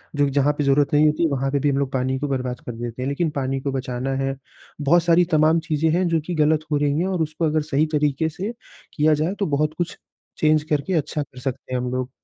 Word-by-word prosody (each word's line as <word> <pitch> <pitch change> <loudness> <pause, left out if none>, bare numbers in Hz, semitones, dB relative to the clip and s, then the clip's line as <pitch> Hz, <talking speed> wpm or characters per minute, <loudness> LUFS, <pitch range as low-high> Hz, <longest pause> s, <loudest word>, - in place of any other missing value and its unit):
जो 145 - +3
कि 140 - -1
जहाँ 145 +1 +2
पे 150 - 0
ज़रूरत 140 +1 +2
नहीं 150 +1 +5
होती, 155 +2 +2
वहाँ 135 0 -1
पे 140 - +1
भी 145 - +1
हम 140 - +1
लोग 140 -1 -1
पानी 130 0 0
को 145 - -2
बर्बाद 125 -2 -2
कर 120 - -4
देते 120 +1 -6
हैं। 135 - -1
लेकिन 155 +3 0
पानी 135 0 -1
को 140 -1 -2
बचाना 130 0 -3
है। 135 0 -1 0.5
बहुत 165 +4 +4
सारी 175 +1 +4
तमाम 155 +1 +4
चीज़ें 160 +1 +2
हैं 180 0 +2
जो 165 -1 +2
कि 175 0 -3
गलत 155 0 +2
हो 145 - +3
रही 145 +1 +1
हैं 185 - 0
और 185 -3 -1
उसको 155 +1 -1
अगर 155 0 +1
सही 145 +3 +3
तरीके 150 +1 +1
से 195 +8 -5 0.4
किया 155 0 +3
जाए, 155 +5 0
तो 200 - +1
बहुत 150 +1 0
कुछ 175 -1 -3 0.4
चेंज 155 -1 +3
करके 150 +5 0
अच्छा 150 -1 -1
कर 130 -2 -14
सकते 130 0 -5
हैं 125 - +1
हम 125 - -3
लोग। 130 0 -2
145 Hz, 260 wpm, -22 LUFS, 135-160 Hz, 0.5 s, नहीं